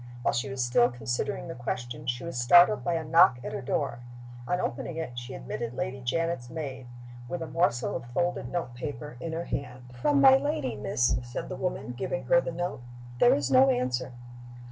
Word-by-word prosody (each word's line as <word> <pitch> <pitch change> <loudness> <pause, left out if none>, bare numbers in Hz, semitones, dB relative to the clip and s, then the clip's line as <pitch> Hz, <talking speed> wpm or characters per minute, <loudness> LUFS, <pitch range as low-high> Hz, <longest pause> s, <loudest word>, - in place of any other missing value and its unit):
While - - +2
she 125 +3 -1
was 130 -1 -2
still 120 0 +4
considering 120 0 -3
the - - -5
question 120 +3 -5
she 120 0 -1
was 170 - -5
startled 175 - +6
by 175 - 0
a 165 - -1
knock 155 -5 +6
at - - -5
her - - -3
door. 120 -1 -2 0.5
On 180 - 0
opening 160 +3 -3
it 160 -6 -3
she 120 +2 -8
admitted 120 0 -5
Lady 130 +1 -3
Janet's 165 0 -1
maid, 135 -4 -6 0.4
with 170 +5 -4
a - - -6
morsel 125 -9 +1
of - - -5
folded 130 -1 -1
note 170 -8 -3
paper 145 +2 -6
in 165 +4 -4
her 170 +1 -3
hand. 125 -3 -5
"From 140 +4 +2
my 135 -1 +8
lady, 140 -3 -2
miss," 115 +4 +1
said 120 +1 -6
the - - -4
woman, 180 -8 -3
giving 130 +1 -3
her 170 +8 +4
the 170 - -4
note. 175 -5 -3 0.4
"There - - +6
is 140 -2 -1
no 130 +1 +7
answer." 125 0 0
130 Hz, 200 wpm, -28 LUFS, 120-160 Hz, 0.5 s, my